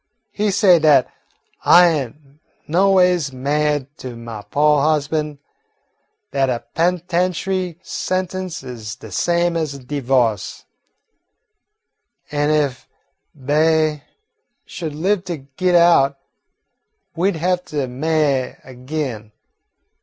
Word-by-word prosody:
"He 210 Hz, 0 st, -1 dB
say 190 Hz, -3 st, +5 dB
dat 150 Hz, -5 st, +4 dB, 0.6 s
I 175 Hz, 0 st, +7 dB
ain't 140 Hz, -8 st, -1 dB, 0.5 s
noways 180 Hz, -2 st, +3 dB
ma'ied 145 Hz, +2 st, 0 dB
to 125 Hz, -2 st, -8 dB
my 115 Hz, -2 st, -8 dB
po' 150 Hz, +5 st, +2 dB
husban', 150 Hz, 0 st, 0 dB, 0.9 s
dat 135 Hz, -1 st, +1 dB
a 120 Hz, -2 st, -2 dB
pen'tentiary 180 Hz, +1 st, 0 dB
sentence 185 Hz, -4 st, -3 dB
is 115 Hz, -5 st, -7 dB
de 130 Hz, -, -12 dB
same 175 Hz, 0 st, +1 dB
as 155 Hz, -4 st, -2 dB
a -, -, -7 dB
divo'ce, 125 Hz, -6 st, -1 dB, 1.7 s
an' 145 Hz, 0 st, 0 dB
if 145 Hz, -4 st, 0 dB, 0.5 s
Be'y 155 Hz, +2 st, +1 dB, 0.6 s
should 160 Hz, -4 st, -6 dB
live 185 Hz, +4 st, 0 dB
to 175 Hz, -3 st, -4 dB
git 150 Hz, +7 st, -1 dB
out, 165 Hz, -5 st, +5 dB, 1.0 s
we 180 Hz, +3 st, +2 dB
'd 200 Hz, -, -3 dB
have 180 Hz, +2 st, 0 dB
to 150 Hz, -6 st, -2 dB
ma'y 140 Hz, 0 st, 0 dB
ag'in. 130 Hz, -4 st, -5 dB
150 Hz, 105 wpm, -20 LUFS, 135-175 Hz, 1.7 s, I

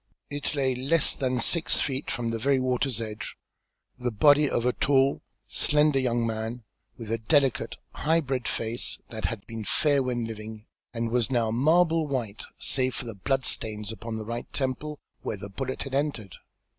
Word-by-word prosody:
It 145 Hz, +1 st, -3 dB
lay 135 Hz, -2 st, +2 dB
less 140 Hz, +6 st, +3 dB
than 130 Hz, -2 st, -1 dB
six 165 Hz, +7 st, +1 dB
feet 135 Hz, 0 st, -1 dB
from 120 Hz, -3 st, -1 dB
the 115 Hz, 0 st, -2 dB
very 135 Hz, +3 st, +3 dB
water's 130 Hz, -1 st, 0 dB
edge, 110 Hz, -1 st, -5 dB, 0.6 s
the 125 Hz, 0 st, 0 dB
body 145 Hz, +6 st, +5 dB
of 120 Hz, -, 0 dB
a 125 Hz, -, +3 dB
tall, 135 Hz, 0 st, +3 dB, 0.3 s
slender 150 Hz, -1 st, +3 dB
young 120 Hz, -2 st, +1 dB
man, 115 Hz, +2 st, -3 dB, 0.3 s
with 115 Hz, -2 st, -6 dB
a 115 Hz, -, 0 dB
delicate, 135 Hz, +2 st, +2 dB, 0.2 s
high 160 Hz, +2 st, +2 dB
bred 130 Hz, -4 st, -2 dB
face 115 Hz, +1 st, -2 dB
that 110 Hz, -1 st, -4 dB
had 110 Hz, -4 st, -3 dB
been 115 Hz, -1 st, -6 dB
fair 145 Hz, +5 st, +3 dB
when 125 Hz, -2 st, -1 dB
living, 110 Hz, -1 st, -7 dB, 0.3 s
and 115 Hz, -1 st, -2 dB
was 120 Hz, -3 st, +2 dB
now 115 Hz, -4 st, +1 dB
marble 160 Hz, +5 st, +3 dB
white, 115 Hz, -7 st, -3 dB, 0.2 s
save 130 Hz, -1 st, +1 dB
for 125 Hz, -, -4 dB
the 115 Hz, -, -5 dB
blood 135 Hz, +7 st, 0 dB
stains 105 Hz, -2 st, -1 dB
upon 115 Hz, 0 st, -6 dB
the 110 Hz, -, -5 dB
right 115 Hz, +2 st, -5 dB
temple, 140 Hz, +3 st, -2 dB, 0.2 s
where 105 Hz, -, -3 dB
the 100 Hz, +1 st, -8 dB
bullet 130 Hz, +6 st, -3 dB
had 135 Hz, -, -8 dB
entered. 135 Hz, -, -1 dB
125 Hz, 180 wpm, -27 LUFS, 115-140 Hz, 0.6 s, body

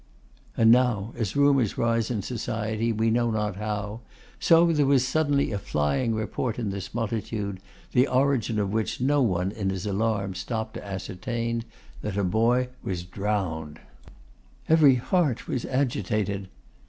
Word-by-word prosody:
And 115 Hz, 0 st, +6 dB
now, 120 Hz, -4 st, +3 dB
as 110 Hz, -5 st, -3 dB
rumours 140 Hz, -6 st, +3 dB
rise 115 Hz, -1 st, +1 dB
in 110 Hz, -6 st, -2 dB
society 110 Hz, -1 st, -2 dB
we 110 Hz, +1 st, +1 dB
know 120 Hz, +1 st, +2 dB
not 105 Hz, -3 st, -1 dB
how, 105 Hz, 0 st, -3 dB, 0.4 s
so 165 Hz, 0 st, +6 dB
there 145 Hz, -3 st, +2 dB
was 135 Hz, -2 st, +4 dB
suddenly 145 Hz, 0 st, +1 dB
a 100 Hz, -, -2 dB
flying 110 Hz, -, 0 dB
report 110 Hz, +2 st, -2 dB
in 110 Hz, -5 st, -2 dB
this 95 Hz, +1 st, -6 dB
multitude, 105 Hz, -3 st, -3 dB, 0.3 s
the 125 Hz, +2 st, +4 dB
origin 130 Hz, -4 st, +1 dB
of 100 Hz, -1 st, -1 dB
which 110 Hz, -1 st, -1 dB
no 140 Hz, +3 st, +2 dB
one 95 Hz, -5 st, +1 dB
in 100 Hz, -2 st, -2 dB
his 95 Hz, 0 st, -3 dB
alarm 100 Hz, -1 st, 0 dB
stopped 110 Hz, +4 st, -4 dB
to -, -, -7 dB
ascertain, 115 Hz, +4 st, -3 dB, 0.4 s
that 100 Hz, -1 st, -4 dB
a 100 Hz, -, +1 dB
boy 115 Hz, +6 st, +2 dB
was 90 Hz, -2 st, -3 dB
drowned. 90 Hz, -5 st, -3 dB, 0.9 s
Every 155 Hz, -4 st, +6 dB
heart 140 Hz, 0 st, 0 dB
was 125 Hz, -, -2 dB
agitated. 105 Hz, -7 st, -1 dB
110 Hz, 150 wpm, -26 LUFS, 100-125 Hz, 0.9 s, And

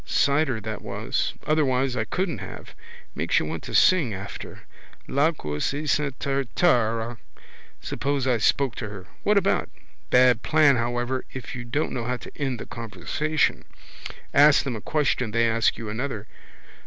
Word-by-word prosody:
Cider 140 Hz, -4 st, +2 dB
that 110 Hz, 0 st, -5 dB
was. 100 Hz, +4 st, -2 dB
Otherwise 135 Hz, -4 st, +1 dB
I -, -, -1 dB
couldn't 180 Hz, -, -2 dB
have. 95 Hz, -, -9 dB, 0.4 s
Makes -, -, 0 dB
you -, -, +2 dB
want 80 Hz, +1 st, -4 dB
to -, -, -5 dB
sing 155 Hz, -, +4 dB
after. 95 Hz, -, -8 dB, 0.5 s
Lacaus 140 Hz, -, 0 dB
esant 145 Hz, -2 st, 0 dB
taratara. 120 Hz, -4 st, +1 dB, 0.6 s
Suppose 140 Hz, -1 st, -1 dB
I 125 Hz, -3 st, +2 dB
spoke 135 Hz, +3 st, +2 dB
to 110 Hz, -, -4 dB
her. 100 Hz, -3 st, -9 dB, 0.2 s
What 210 Hz, 0 st, +3 dB
about? 195 Hz, 0 st, +1 dB, 0.4 s
Bad 125 Hz, -2 st, +5 dB
plan 150 Hz, -3 st, +4 dB
however 120 Hz, +2 st, -1 dB
if 130 Hz, -2 st, -7 dB
you 125 Hz, -, -5 dB
don't 140 Hz, +6 st, -1 dB
know 120 Hz, -2 st, -3 dB
how 125 Hz, +1 st, -1 dB
to -, -, -12 dB
end 135 Hz, -4 st, -2 dB
the -, -, -6 dB
conversation. 150 Hz, +7 st, -1 dB, 0.7 s
Ask 145 Hz, +1 st, +6 dB
them 130 Hz, -4 st, -3 dB
a 110 Hz, -, -6 dB
question 135 Hz, -5 st, 0 dB
they 115 Hz, +2 st, +2 dB
ask 115 Hz, 0 st, +2 dB
you 115 Hz, -, -6 dB
another. 110 Hz, 0 st, -4 dB
125 Hz, 155 wpm, -25 LUFS, 115-145 Hz, 0.7 s, Ask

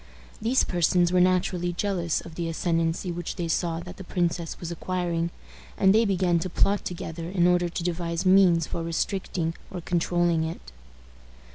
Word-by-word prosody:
These 240 Hz, +4 st, +3 dB
persons 175 Hz, 0 st, +2 dB
were 180 Hz, -, +5 dB
naturally 180 Hz, -1 st, +1 dB
jealous 175 Hz, -3 st, -1 dB
of 165 Hz, -, -11 dB
the 165 Hz, 0 st, -3 dB
ascendency 165 Hz, +1 st, 0 dB
which 175 Hz, 0 st, -4 dB
they 170 Hz, -, -3 dB
saw 165 Hz, 0 st, 0 dB
that 180 Hz, +1 st, -10 dB
the 190 Hz, -, -8 dB
princess 170 Hz, -2 st, -2 dB
was 170 Hz, -1 st, -5 dB
acquiring, 170 Hz, -1 st, -2 dB, 0.5 s
and 190 Hz, 0 st, +5 dB
they 225 Hz, +2 st, +4 dB
began 185 Hz, -4 st, +2 dB
to 185 Hz, -, -3 dB
plot 200 Hz, +3 st, +1 dB
together 165 Hz, -1 st, -5 dB
in 180 Hz, -2 st, +2 dB
order 175 Hz, -1 st, +3 dB
to 170 Hz, -, -4 dB
devise 170 Hz, 0 st, -2 dB
means 185 Hz, -3 st, +5 dB
for 170 Hz, -, -4 dB
restricting 165 Hz, 0 st, -2 dB, 0.2 s
or 190 Hz, -, -6 dB
controlling 175 Hz, -1 st, +1 dB
it. 160 Hz, -, -6 dB
175 Hz, 165 wpm, -26 LUFS, 165-185 Hz, 0.5 s, were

